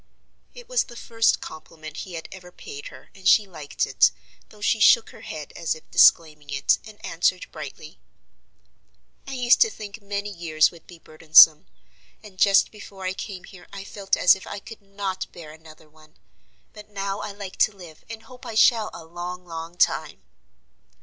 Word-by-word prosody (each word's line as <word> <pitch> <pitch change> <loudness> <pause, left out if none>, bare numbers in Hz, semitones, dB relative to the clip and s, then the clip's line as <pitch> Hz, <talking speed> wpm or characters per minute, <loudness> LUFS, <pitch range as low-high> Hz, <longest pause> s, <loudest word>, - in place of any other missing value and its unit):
It - - -12
was - - +1
the 240 - -13
first 230 -1 +1
compliment 155 -1 -10
he 185 - -7
had 165 -1 -7
ever 180 -1 -12
paid 140 -5 -10
her, - - -14
and 190 -1 -6
she 210 +2 +6
liked 155 -7 -4
it, 65 - +4 0.4
though 210 - -18
she 210 +2 +1
shook 225 +1 +5
her - - -15
head 155 -2 -8
as 165 -1 -2
if 160 - -16
disclaiming 150 -3 +4
it, 135 0 +1
and 215 -1 -13
answered 180 +2 0
brightly: - - -10 1.3
"I 270 - -6
used 250 -1 +3
to 450 - +6
think 210 - -10
many 200 0 -4
years 165 -4 +2
would 170 -2 -18
be 175 - -13
burdensome, 155 -1 +6 0.6
and 195 -3 -15
just 200 -1 +4
before 200 -2 -11
I 185 - -1
came 190 -2 -7
here 180 -2 -15
I 200 0 -8
felt 195 0 -2
as 180 - +6
if 190 - -8
I - - -6
could 220 +2 -11
not 195 -1 -5
bear 165 -3 -11
another 160 0 -16
one. 155 0 -22 0.6
But 210 0 -13
now 200 0 -4
I 210 - -5
like 200 -2 -9
to - - +3
live, 170 -4 -13
and 225 -1 -8
hope 250 +2 -16
I 225 - -7
shall 220 -1 +4
a 165 - -10
long, 175 +2 -7
long 165 0 -8
time." - - 0
185 Hz, 185 wpm, -24 LUFS, 160-205 Hz, 1.3 s, she